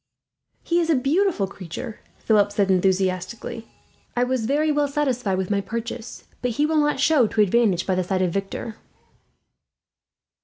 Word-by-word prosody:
"He 340 0 +1
is 335 -1 0
a 320 - +4
beautiful 295 - +1
creature," 195 +5 -8 0.2
Philip 205 -2 +2
said 200 -1 +1
enthusiastically. 190 +4 -1 0.5
"I 245 - +3
was 250 -3 -1
very 300 +3 +2
well 295 -1 +1
satisfied 255 -9 -1
with 190 +1 -2
my 200 -1 +1
purchase, 230 +2 -6 0.2
but 250 - 0
he 295 - +3
will 315 +1 +1
not 295 -2 +1
show 275 -4 +4
to 215 - -4
advantage 205 -3 +3
by 190 - +1
the 185 0 +1
side 185 +1 0
of 175 -2 0
Victor." 200 +3 -4
225 Hz, 160 wpm, -23 LUFS, 195-280 Hz, 0.5 s, a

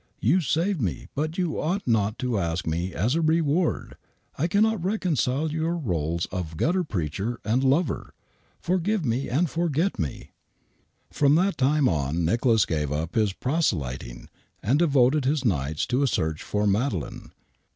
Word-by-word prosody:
You 160 - +3
saved 165 +4 0
me, 95 -6 -3
but 155 +3 -2
you 175 -4 -1
ought 180 +4 -2
not 110 -2 +1
to 120 -5 0
ask 85 -2 -2
me 85 +3 -2
as 105 +10 0
a 165 - +1
reward. 160 +1 +1 0.4
I 160 - 0
cannot 210 0 +2
reconcile 160 - 0
your 160 +2 -1
roles 85 - -1
of 85 -4 -4
gutter 180 - +1
preacher 100 - -3
and 120 +5 +1
lover. 145 +6 0 0.4
Forgive 185 +1 0
me 125 +3 -1
and 155 +8 +2
forget 165 +4 0
me 75 -5 -4
I" - - -45 0.8
From 145 0 +4
that 185 +2 +2
tinie 140 +1 +3
on 80 +1 0
Nicholas 115 +4 +3
gave 75 -3 -2
up 80 +4 -2
his 110 -3 +2
proselyting 70 - -2 0.4
and 130 +9 +2
devoted 140 -3 +3
his 140 0 +1
nights 75 - 0
to 125 +3 0
a 140 - +3
search 80 -8 -1
for 105 0 -1
Madeleine. 100 - -1
130 Hz, 160 wpm, -25 LUFS, -, 0.8 s, From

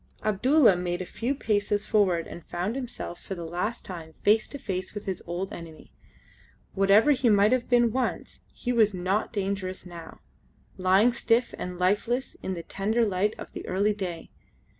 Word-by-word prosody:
Abdulla 230 - +4
made 175 0 -2
a - - -8
few 240 +9 -2
paces 205 -4 0
forward 185 -6 +2
and 170 - -9
found 180 +6 -3
himself 245 -9 -6
for 195 - -6
the 170 -2 -6
last 180 +7 -3
time 165 -4 -8
face 215 +2 +4
to 285 - -6
face 190 -5 -4
with 205 - -6
his 190 -3 -3
old 175 +3 -4
enemy. 165 -2 -10 0.8
Whatever 200 +8 +5
he 260 -3 +3
might 205 +1 +5
have 255 -2 +1
been 240 -2 +4
once 255 +2 -2
he 245 - -3
was 215 -4 +3
not 185 +4 -1
dangerous 195 -3 -3
now, 170 -2 -10 0.6
lying 190 +6 +4
stiff 235 +1 +1
and 180 0 -6
lifeless 205 +8 0
in 190 - -3
the 170 - -6
tender 220 +6 0
light 205 +1 0
of - - -9
the - - -7
early 200 +3 +1
day. 180 -5 -6
200 Hz, 175 wpm, -27 LUFS, 180-230 Hz, 0.8 s, Whatever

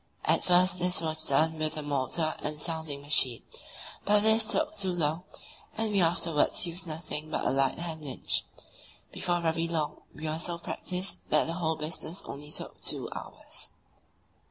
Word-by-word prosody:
At - - +3
first 180 0 +4
this 180 0 +3
was 155 -1 +2
done 160 +3 +3
with 155 0 -1
the 155 - -3
motor 145 +3 0
and 150 0 -3
sounding 160 -3 -2
machine, 130 -5 +5 0.6
but 205 0 +4
this 220 0 +5
took 310 0 +1
too 190 -8 +2
long, 165 0 -1 0.5
and 220 -1 +1
we 200 -2 +3
afterwards 165 -2 +2
used 175 +1 -4
nothing 155 -1 -4
but - - -2
a - - +3
light 135 0 +2
hand 165 -2 -5
winch. 140 -4 -1 0.7
Before 175 -1 -1
very 165 0 0
long 160 -3 -2
we 155 +1 -5
were 155 +1 -2
so 170 0 -3
practised 180 +2 -2
that 155 - +4
the 165 - -3
whole 165 -2 -1
business 160 +3 -4
only 145 +1 -8
took - - -5
two - - -2
hours. - - -8
160 Hz, 170 wpm, -29 LUFS, 155-180 Hz, 0.7 s, machine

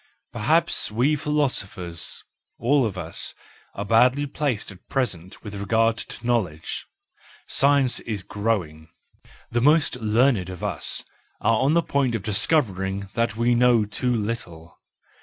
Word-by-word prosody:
Perhaps 160 +10 +2
we 125 +8 +2
philosophers, 105 - -2 0.3
all 135 0 +2
of 100 -3 -6
us, 85 -2 -2 0.4
are 100 - -4
badly 125 +7 +4
placed 135 -7 -2
at 95 -1 -17
present 100 -9 -3
with 105 -2 -8
regard 110 +3 +1
to 115 - -7
knowledge: 100 -11 -1 0.6
science 140 -2 +3
is 105 -4 -4
growing, 90 -8 -2 0.6
the 120 0 +1
most 150 -1 +3
learned 110 -3 +2
of 90 -2 -8
us - - -1 0.3
are 115 0 +2
on 145 +4 +2
the 170 - +3
point 135 -6 0
of 105 - -4
discovering 100 - 0
that 115 -2 0
we 120 +2 +2
know 120 -2 +4
too 125 +4 -1
little. 95 -7 -5
115 Hz, 135 wpm, -24 LUFS, 100-130 Hz, 0.6 s, badly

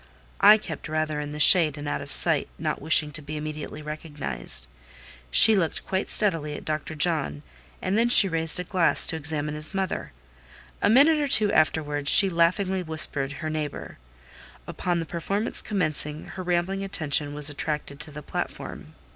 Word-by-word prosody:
I 210 +2 +7
kept 210 - -8
rather 155 -1 -2
in 145 0 -5
the 150 0 -8
shade 155 -2 +6
and 145 0 -7
out 145 - -3
of 140 +1 -10
sight, 160 0 +2
not 155 -1 -4
wishing 155 -1 +2
to 150 - -4
be 155 +1 -7
immediately 155 0 -7
recognised: 150 - -3 0.6
she 215 - +8
looked 175 -5 -2
quite 190 0 -3
steadily 165 -8 0
at - - -10
Dr. 155 +1 -4
John, 150 - -2 0.4
and 190 - -1
then 235 +1 +2
she 220 -4 +7
raised 165 -1 -1
a - - -3
glass 180 -1 +2
to - - 0
examine 150 -1 -2
his 155 +5 -2
mother; 190 -2 -4 0.7
a - - +2
minute 290 +7 +4
or 290 - -1
two 215 -6 +3
afterwards 150 -3 0
she 195 -2 +6
laughingly 185 +3 0
whispered 150 -4 -5
her 150 +3 -6
neighbour; 150 - -6 0.7
upon 175 -1 -3
the 165 - -4
performance 195 +7 -3
commencing, 155 -6 -3
her 185 - -8
rambling 180 +2 -2
attention 150 -6 0
was 150 0 +4
attracted 145 -1 -5
to 150 +1 0
the 150 0 -10
platform. - - -7
155 Hz, 170 wpm, -24 LUFS, 150-185 Hz, 0.7 s, she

